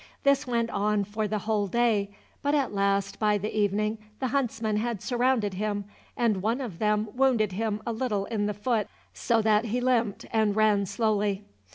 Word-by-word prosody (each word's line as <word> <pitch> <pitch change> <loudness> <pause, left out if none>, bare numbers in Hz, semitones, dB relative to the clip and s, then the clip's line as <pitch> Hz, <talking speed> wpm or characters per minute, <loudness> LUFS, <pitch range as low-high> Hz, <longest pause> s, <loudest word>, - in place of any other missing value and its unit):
This 280 -2 +3
went 235 -1 0
on 205 0 +1
for 210 +2 -2
the 215 +1 -1
whole 210 -1 0
day, 220 -2 +1 0.3
but 285 +1 +1
at 275 -7 0
last 200 0 0
by 210 -1 +3
the 210 +2 -4
evening 210 +1 +1 0.2
the 260 - -1
huntsmen 230 -5 0
had 230 -1 -1
surrounded 245 -3 +1
him, 205 +1 -2 0.3
and 220 -6 +1
one 225 +6 0
of 225 -11 -6
them 210 0 +1
wounded 245 -6 +2
him 215 +2 -2
a 235 - -1
little 220 -4 -1
in 205 -2 -1
the 210 - -2
foot, 215 0 0 0.3
so 230 -2 +1
that 215 +1 +3
he 230 +2 -1
limped 240 -5 0
and 215 -2 +2
ran 210 -2 +3
slowly. 205 -1 0
215 Hz, 185 wpm, -27 LUFS, 205-235 Hz, 0.3 s, This